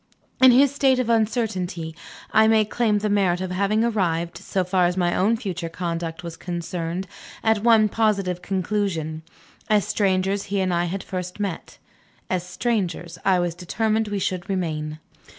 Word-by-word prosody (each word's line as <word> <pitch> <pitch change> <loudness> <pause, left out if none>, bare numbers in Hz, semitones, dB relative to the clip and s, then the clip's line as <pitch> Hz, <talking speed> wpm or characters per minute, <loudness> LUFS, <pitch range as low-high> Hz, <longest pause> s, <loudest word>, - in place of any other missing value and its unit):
In 260 - +9
this 265 +2 +5
state 270 -2 +3
of 245 -2 0
uncertainty 205 -8 -1 0.4
I 220 0 +5
may 220 -1 +4
claim 215 0 +1
the 210 +1 -1
merit 195 -4 +2
of 185 -1 -4
having 200 +4 +1
arrived, 175 -7 0
so 190 - -1
far 180 -1 +2
as 180 +1 -2
my 175 -1 +2
own 220 +5 +2
future 180 -6 -4
conduct 170 0 -4
was 170 -1 -6
concerned, 175 +1 -4 0.4
at 220 -2 +2
one 225 -2 +6
positive 200 -5 0
conclusion. 185 -5 -2 0.5
As 210 -2 +3
strangers 195 0 +1
he 200 0 -1
and 185 -1 +1
I 175 0 +1
had 190 +2 -4
first 180 0 -5
met. 195 -5 -4 0.5
As 185 -2 0
strangers 180 -3 -2
I 190 -1 +4
was 175 -1 0
determined 220 +5 -1
we 205 -1 -2
should 185 0 -2
remain. 155 -5 -2
190 Hz, 165 wpm, -23 LUFS, 175-215 Hz, 0.5 s, In